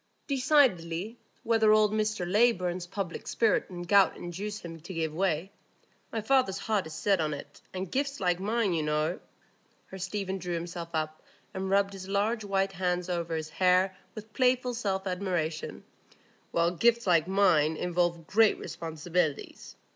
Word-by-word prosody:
"Decidedly, 235 - +2 0.2
whenever 225 -2 +4
old 215 -1 +4
Mr 215 -3 0
Leyburn's 185 -4 +2
public 190 -2 -5
spirit 225 -2 +1
and 175 -1 -7
gout 200 +1 +5
induce 200 +5 -5
him 165 -1 -8
to 170 +4 -9
give 160 -2 -1
way. 180 +1 -1 0.6
My 225 - -2
father's 220 -4 +2
heart 205 -4 -1
is 160 - -8
set 195 -1 +1
on 150 -1 -1
it; 140 - -11
and 185 -1 -5
gifts 280 +1 -1
like 180 -2 +1
mine, 210 0 0
you 165 - 0
know"—here 155 +4 -5
Stephen 190 +1 -3
drew 180 -1 -3
himself 170 0 -5
up, 155 0 -2 0.3
and 190 0 -3
rubbed 200 0 +2
his 190 -1 -8
large 210 +3 0
white 195 -1 0
hands 180 -1 -1
over 170 -2 -2
his 155 -1 -4
hair 185 +2 +3 0.2
with 215 0 -10
playful 250 -1 +2
self 195 -5 -2
admiration—"gifts 180 +3 -2
like 170 -3 +3
mine 170 -6 +3
involve 175 -1 0
great 220 +4 +4
responsibilities. 160 -1 -3
185 Hz, 145 wpm, -29 LUFS, 170-210 Hz, 0.6 s, gout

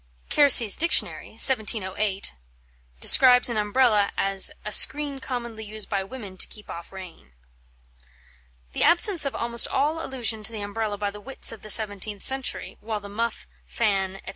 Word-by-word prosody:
Kersey's 245 -8 +5
Dictionary 335 +1 0
(1708) 210 - 0 0.7
describes 250 - +6
an 225 - -4
Umbrella 210 -1 0
as 195 -1 +3
a 210 - -6
"screen 285 +5 +3
commonly 235 -4 -7
used 215 0 -8
by 200 -2 -3
women 200 -3 -11
to - - -5
keep 210 - -12
off 170 0 -11
rain." 175 - -14 1.4
The - - -6
absence 345 -1 +3
of 275 - -5
almost 235 0 +1
all 305 +4 -2
allusion 235 -4 -4
to 210 - -5
the 220 -2 -8
Umbrella 205 0 -5
by 205 0 -4
the 210 +1 -13
wits 270 +4 -3
of 225 - -12
the 215 - -12
seventeenth 205 -1 +1
century, 265 -1 -1
while 215 0 -6
the 200 0 -13
muff, 230 +3 -5 0.2
fan, 195 -4 -3
&c. - - -9
220 Hz, 160 wpm, -23 LUFS, 200-250 Hz, 1.4 s, describes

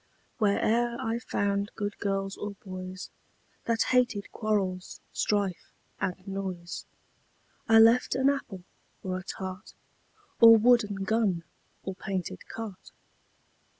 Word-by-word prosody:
Where 205 -2 +3
e'er 235 +1 +1
I 225 +1 -1
found 200 -3 -1
good 205 -1 -3
girls 195 0 -1
or 205 -1 -5
boys, 185 0 -7 0.5
That 230 -1 +2
hated 245 -5 +2
quarrels, 195 -4 -1
strife 200 -4 -1 0.3
and 185 0 -3
noise, 190 -3 -5 0.8
I 225 - +7
left 230 +3 +6
an 265 +1 +3
apple, 255 -10 -1 0.4
or 185 -1 -2
a - - -10
tart, 190 +1 -7 0.6
Or 230 -1 +10
wooden 215 -4 +3
gun, 195 -4 +1 0.4
or 190 - -4
painted 190 -2 -5
cart. 220 -4 -7
200 Hz, 115 wpm, -28 LUFS, 190-225 Hz, 0.8 s, Or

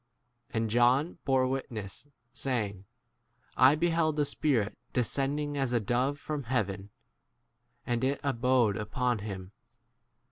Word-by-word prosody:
And 110 -1 -1
John 125 +9 +3
bore 130 -1 +3
wit 135 +1 -2
ness, 105 +3 -7 0.3
saying, 110 -6 -2 0.7
I 130 +3 +6
beheld 165 -1 +1
the 150 -1 +2
Spirit 130 -8 0 0.2
descending 145 +4 0
as 135 -3 0
a 120 - +4
dove 125 +6 0
from 145 -2 -5
hea 125 +4 -2
33 100 -5 +1
ven, 100 0 -12 1.0
and 120 0 -1
it 135 +2 +1
abode 125 -5 +2
upon 120 +2 -1
him. 95 -2 -6
125 Hz, 135 wpm, -30 LUFS, 110-140 Hz, 1.0 s, I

